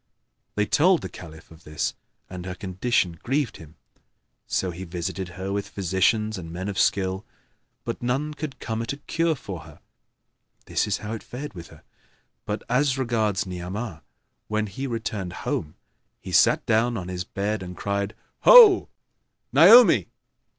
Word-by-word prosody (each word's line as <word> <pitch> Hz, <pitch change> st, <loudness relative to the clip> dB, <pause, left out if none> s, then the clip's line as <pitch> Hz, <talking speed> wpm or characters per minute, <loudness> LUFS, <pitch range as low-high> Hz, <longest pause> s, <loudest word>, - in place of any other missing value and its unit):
They 105 Hz, -, +1 dB
told 175 Hz, -, +3 dB
the -, -, -5 dB
Caliph 80 Hz, -2 st, -12 dB
of 80 Hz, 0 st, -16 dB
this 75 Hz, 0 st, -2 dB, 0.3 s
and 90 Hz, 0 st, -8 dB
her 90 Hz, -, -5 dB
condition 95 Hz, -3 st, -1 dB
grieved 135 Hz, -1 st, -1 dB
him; 80 Hz, 0 st, -14 dB, 0.7 s
so 95 Hz, -, -1 dB
he 90 Hz, +2 st, -7 dB
visited 90 Hz, +1 st, -4 dB
her 95 Hz, +1 st, -3 dB
with 100 Hz, 0 st, -3 dB
physicians 100 Hz, +3 st, 0 dB
and 85 Hz, -2 st, -8 dB
men 95 Hz, +4 st, -4 dB
of 95 Hz, -3 st, -3 dB
skill, 95 Hz, +1 st, +1 dB, 0.6 s
but -, -, -5 dB
none 135 Hz, +5 st, -1 dB
could 150 Hz, -2 st, -6 dB
come 110 Hz, 0 st, -3 dB
at 115 Hz, -, -3 dB
a -, -, -8 dB
cure 165 Hz, +2 st, 0 dB
for 100 Hz, -, -7 dB
her. 80 Hz, -1 st, -14 dB, 0.9 s
This -, -, 0 dB
is 105 Hz, -, 0 dB
how 110 Hz, -, -4 dB
it 110 Hz, -, -5 dB
fared 135 Hz, +1 st, -8 dB
with 85 Hz, -3 st, -9 dB
her; -, -, -17 dB, 0.6 s
but 105 Hz, 0 st, -3 dB
as 135 Hz, +2 st, +2 dB
regards 110 Hz, -6 st, 0 dB
Ni'amah, 90 Hz, +1 st, -6 dB, 0.5 s
when 110 Hz, 0 st, -1 dB
he 120 Hz, +7 st, -5 dB
returned 105 Hz, -6 st, -4 dB
home 75 Hz, -, -2 dB, 0.4 s
he -, -, -9 dB
sat -, -, +4 dB
down 115 Hz, +1 st, +2 dB
on 90 Hz, -3 st, -5 dB
his 90 Hz, -1 st, -4 dB
bed 100 Hz, +2 st, -3 dB
and 90 Hz, -1 st, -8 dB
cried, 100 Hz, +2 st, -2 dB, 0.2 s
"Ho, 455 Hz, -6 st, +8 dB, 0.6 s
Naomi!" 220 Hz, -, +8 dB
100 Hz, 160 wpm, -25 LUFS, 90-120 Hz, 0.9 s, Ho